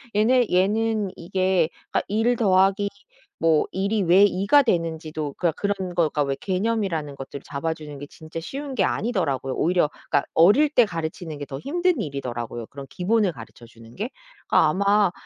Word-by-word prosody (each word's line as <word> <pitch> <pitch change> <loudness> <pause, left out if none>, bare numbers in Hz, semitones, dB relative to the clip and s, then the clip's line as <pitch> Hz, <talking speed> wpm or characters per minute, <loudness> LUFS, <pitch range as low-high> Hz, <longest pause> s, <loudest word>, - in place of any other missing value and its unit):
얘네 240 +3 +3
얘는 210 +3 +1
이게 185 -1 +1 0.2
그러니까 - - +1
1 225 +3 +1
더하기 195 -1 +3 0.5
뭐 160 -2 +3
1 195 +1 -1
이 210 - +2
왜 185 +3 +6
2 195 -1 -1
가 285 +5 +6
되는지도 160 - -2
그러니까 170 -3 -1
그런 195 -3 -2
거가 155 -3 +1
왜 140 -1 -1
개념이라는 190 -7 -1
것들을 135 0 -8
잡아주는 150 0 -5
게 145 - -7
진짜 160 +2 -9
쉬운 275 - -6
게 200 - +2
아니더라고요. 160 - -1
오히려 175 -2 +2
그러니까 145 - -1
어릴 205 - +5
때 255 -4 +5
가르치는 165 -3 -5
게 145 - -6
더 135 -1 -7
힘든 345 - 0
일이더라고요 120 - -5
그런 140 -1 -9
기본을 200 +1 +1
가르쳐 120 -2 -12
주는 115 0 -16
게. 215 +5 -3 0.4
그러니까 160 - +5
아마 200 +3 +3
180 Hz, 375 characters per minute, -24 LUFS, 150-210 Hz, 0.5 s, 왜